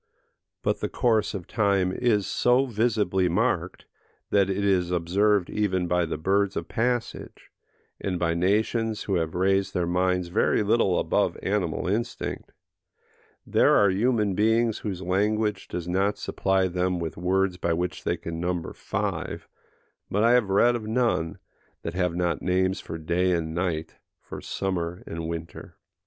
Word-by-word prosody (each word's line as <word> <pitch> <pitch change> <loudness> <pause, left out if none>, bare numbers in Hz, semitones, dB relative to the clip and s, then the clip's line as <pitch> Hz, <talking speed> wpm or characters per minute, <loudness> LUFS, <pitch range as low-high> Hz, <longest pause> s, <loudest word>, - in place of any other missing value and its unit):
But - - 0
the - - -2
course 110 -4 +1
of 90 -3 -5
time 100 -4 +1
is 105 -2 +1
so 125 +2 +2
visibly 110 -6 +1
marked, 85 - -1 0.5
that 100 -2 +3
it 100 +1 -1
is 90 -3 +2
observed 90 +3 +2
even 95 -4 0
by 90 -1 +1
the 80 - -3
birds 100 +4 +1
of - - -3
passage, 120 +1 -3 0.5
and 95 -2 -2
by 85 -1 0
nations 110 +5 0
who 95 -3 0
have 80 -1 -2
raised 95 +2 +1
their 90 - +1
minds 90 0 0
very 105 +3 +2
little 100 -3 +2
above - - +1
animal 95 -4 -1
instinct: 115 +5 -3 0.9
there - - +4
are 100 -2 +5
human 105 0 +1
beings 110 +2 +2
whose 95 -3 -4
language 105 +2 0
does 90 -1 -5
not 95 +3 +1
supply 95 -1 0
them 90 0 -1
with 85 -2 -4
words 95 +1 0
by 85 - -1
which 85 0 -3
they - - 0
can 80 0 -6
number 90 -1 -2
five, - - -4 0.6
but 105 +2 +1
I 115 - +5
have 120 -5 +3
read 120 +5 +4
of 110 -2 -5
none, 110 -8 0 0.5
that 85 - -4
have 90 -2 0
not 90 -1 0
names 95 +1 +1
for 80 - -6
day 85 +3 +1
and 80 -2 -2
night, 85 -2 -2 0.2
for - - -9
summer 90 -2 -3
and 80 0 -5
winter. 85 0 -7
95 Hz, 155 wpm, -26 LUFS, 90-105 Hz, 0.9 s, are